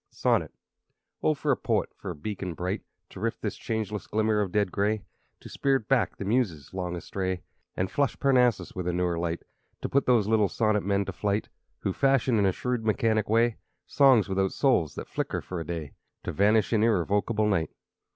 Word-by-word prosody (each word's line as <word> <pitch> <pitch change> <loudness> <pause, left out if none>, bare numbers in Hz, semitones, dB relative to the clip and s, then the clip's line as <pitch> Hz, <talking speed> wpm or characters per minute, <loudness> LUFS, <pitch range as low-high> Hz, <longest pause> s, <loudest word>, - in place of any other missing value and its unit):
Sonnet - - +1 0.7
Oh 155 - +2
for 145 +1 0
a - - +4
poet 110 -5 -1
for 100 - -8
a 90 - -4
beacon 90 +2 -5
bright 90 +6 -2 0.3
To - - -10
rift - - -3
this - - -2
changeless 105 -2 -3
glimmer 110 0 +1
of 95 -3 -2
dead 100 -2 +1
gray; 105 +2 0 0.4
To - - -10
spirit 135 -5 0
back 120 -9 +1
the 100 - -5
Muses, 100 - -1
long 90 -2 -3
astray, 95 0 -3 0.3
And 90 +1 -1
flush 140 -1 0
Parnassus 125 -9 +3
with 90 -1 -4
a 90 - 0
newer 90 -1 0
light; 85 0 -2 0.4
To - - -1
put 140 0 +1
these 120 -5 +4
little 110 -3 +3
sonnet 110 -2 +1
men 100 0 0
to 95 - -5
flight 105 +3 -1 0.3
Who 95 - -1
fashion, 135 -3 +2
in 100 - +3
a - - +3
shrewd, 125 +4 -2
mechanic 110 -1 +1
way, 115 +1 +3 0.3
Songs 130 -8 +5
without 95 0 0
souls, 120 - +2
that - - -6
flicker - - -2
for 90 - -6
a - - -3
day, 80 -4 -5 0.3
To - - -3
vanish 105 +3 +3
in 110 - +3
irrevocable 105 0 +2
night. 95 -7 +1
105 Hz, 195 wpm, -27 LUFS, 95-115 Hz, 0.7 s, Songs